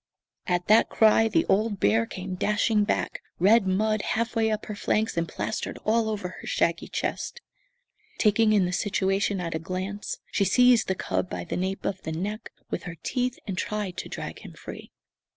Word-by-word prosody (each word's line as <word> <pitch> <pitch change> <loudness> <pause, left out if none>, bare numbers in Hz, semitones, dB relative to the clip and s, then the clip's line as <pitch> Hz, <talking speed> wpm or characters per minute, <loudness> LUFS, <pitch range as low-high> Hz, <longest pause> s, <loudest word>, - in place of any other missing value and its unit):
At 180 -1 0
that 215 +2 +5
cry 220 0 +5
the 325 +9 +2
old 205 0 +1
bear 115 +2 +3
came 185 0 -6
dashing 210 +2 +2
back, - - -1 0.2
red 200 +3 +5
mud 215 +3 +1
half 230 +4 -1
way 225 -1 +2
up 215 0 -2
her 210 - -5
flanks 215 +2 0
and 170 0 0
plastered - - -3
all 220 0 +2
over 205 -4 -3
her - - -9
shaggy 170 0 0
chest. 485 - -3 0.8
Taking 215 0 +4
in 205 -3 +4
the 180 - -2
situation 195 0 0
at 170 -2 -3
a 160 - -1
glance, 185 +4 -4
she - - +2
seized 245 +4 +5
the 190 - 0
cub 95 - -2
by 90 -1 -4
the - - -4
nape 190 +2 -2
of 190 -1 -2
the 160 - -5
neck 205 +7 -4 0.2
with - - -3
her 175 -2 -6
teeth, 250 0 -1
and 195 -3 -3
tried 205 -1 -3
to - - -5
drag - - -6
him - - -11
free. - - -9
205 Hz, 190 wpm, -26 LUFS, 185-220 Hz, 0.8 s, that